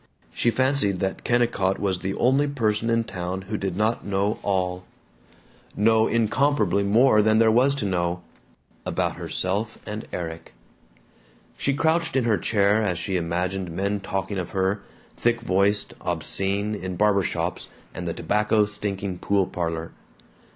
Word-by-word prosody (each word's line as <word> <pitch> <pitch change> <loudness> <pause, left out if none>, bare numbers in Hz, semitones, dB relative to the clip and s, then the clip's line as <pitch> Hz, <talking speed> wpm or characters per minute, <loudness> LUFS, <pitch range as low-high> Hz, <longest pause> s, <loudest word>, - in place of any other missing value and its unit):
She 120 - +1
fancied 130 -4 +1
that 95 +1 -3
Kennicott 115 -6 +1
was 95 -3 -1
the 95 +1 -3
only 135 +4 +3
person 115 -5 0
in 115 0 +2
town 95 -2 -5
who 105 +3 -5
did 95 -3 -3
not 110 +2 0
know 100 +1 -1
all 90 -2 -1 0.9
know 110 +1 +4
incomparably 115 -3 +2
more 110 +3 +4
than 110 +1 +3
there 110 0 +5
was 130 +5 +4
to 140 - -2
know 90 -2 -1 0.6
about - - -1
herself 100 +4 -2
and 105 +1 -6
Erik. 85 -2 -6 1.0
She 140 - 0
crouched 160 +1 +1
in 130 - +3
her 110 -4 +2
chair 105 +2 +2
as 95 -5 0
she 95 +2 -2
imagined 90 +2 -1
men 100 +4 -1
talking 95 0 -3
of 90 -1 -4
her, 95 +2 +1 0.4
thick 120 0 +1
voiced, 100 -1 +1
obscene, 100 +2 0
in 95 -3 -4
barber 105 0 +3
shops 85 -1 -3 0.2
and 90 0 -5
the 85 - -1
tobacco 105 +4 +2
stinking 100 -3 -4
pool 100 -2 +1
parlor. 85 -2 -3
100 Hz, 150 wpm, -24 LUFS, 95-110 Hz, 1.0 s, there